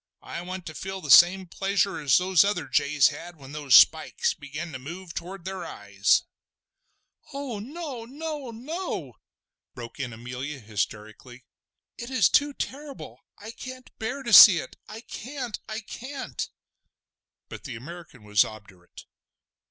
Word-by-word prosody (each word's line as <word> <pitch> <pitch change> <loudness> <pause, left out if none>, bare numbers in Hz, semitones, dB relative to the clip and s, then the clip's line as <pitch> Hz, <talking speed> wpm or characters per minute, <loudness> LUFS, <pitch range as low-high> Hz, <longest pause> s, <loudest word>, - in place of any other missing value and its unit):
I - - -6
want 185 0 -7
to 155 - -7
feel 190 +4 -6
the 150 -6 -2
same 185 +2 +7
pleasure 195 0 -1
as 140 -4 +4
the 185 0 +4
other 175 -8 -2
jays 140 +2 +3
had 175 +1 -9
when 135 -3 -13
those 145 -3 +3
spikes 160 0 +5
began 150 +4 -7
to 130 - -7
move 170 +6 -9
toward 180 +1 -7
their 190 -1 -5
eyes!" 100 -8 +1 1.1
"Oh 275 -6 -5
no! 270 0 -7
no! 295 +1 -6
no!" 235 - -6 0.6
broke 120 +1 -9
in 125 -3 -3
Amelia 125 +5 -6
hysterically. 110 +3 -5 0.5
"It 235 - -6
is 260 -1 +3
too 290 -1 +3
terrible! 280 0 -7 0.2
I 220 +2 -9
can't 255 +1 -10
bear 270 +5 -4
to 235 -3 -2
see 195 -2 +11
it!—I 215 +9 -8
can't! 250 -1 -6
I 215 +1 -4
can't!" 265 +5 -6 1.0
But - - -10
the 130 -5 -6
American 145 -1 -11
was 105 -1 +4
obdurate. 100 -5 -13
175 Hz, 145 wpm, -26 LUFS, -, 1.1 s, see